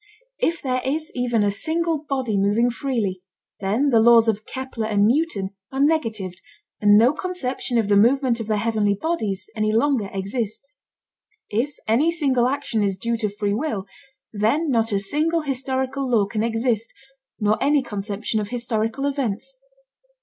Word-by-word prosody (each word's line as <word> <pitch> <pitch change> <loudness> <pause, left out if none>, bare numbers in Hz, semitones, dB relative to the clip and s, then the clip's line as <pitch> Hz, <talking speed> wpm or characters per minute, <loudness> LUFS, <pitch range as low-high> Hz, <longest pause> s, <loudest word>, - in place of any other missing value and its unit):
If 335 0 0
there 255 -2 0
is 310 +4 -2
even 240 -3 +1
a 205 - +2
single 325 +8 -1
body 260 -6 -1
moving 205 +5 +2
freely, 230 -8 -2 0.4
then 215 +9 +1
the 230 - +5
laws 230 0 +6
of 215 -1 -1
Kepler 260 -4 -4
and 205 -2 +3
Newton 230 - +1 0.2
are 270 - -4
negatived 225 - 0 0.4
and 205 0 +6
no 240 +6 +5
conception 270 -9 -3
of 225 -3 +2
the 205 - +3
movement 240 +3 +3
of 225 - -5
the 215 -1 +1
heavenly 210 -2 +1
bodies 205 - -2
any 215 -1 +1
longer 230 -2 +1
exists. 215 +7 -4 0.8
If 245 +7 -1
any 250 +9 +3
single 270 -7 +2
action 255 -4 -1
is 195 -2 0
due 235 +4 -1
to 215 -2 -1
free 205 0 -2
will, 220 -5 -2 0.5
then 235 +10 +1
not 225 -2 +1
a 200 - +1
single 310 +11 +1
historical 265 -1 -2
law 225 -5 +3
can 210 +2 -3
exist, 230 0 0 0.5
nor 215 0 +1
any 285 0 +3
conception 210 0 -3
of 205 -1 -4
historical 235 +1 -2
events. 275 - -2
230 Hz, 160 wpm, -23 LUFS, 210-275 Hz, 0.8 s, laws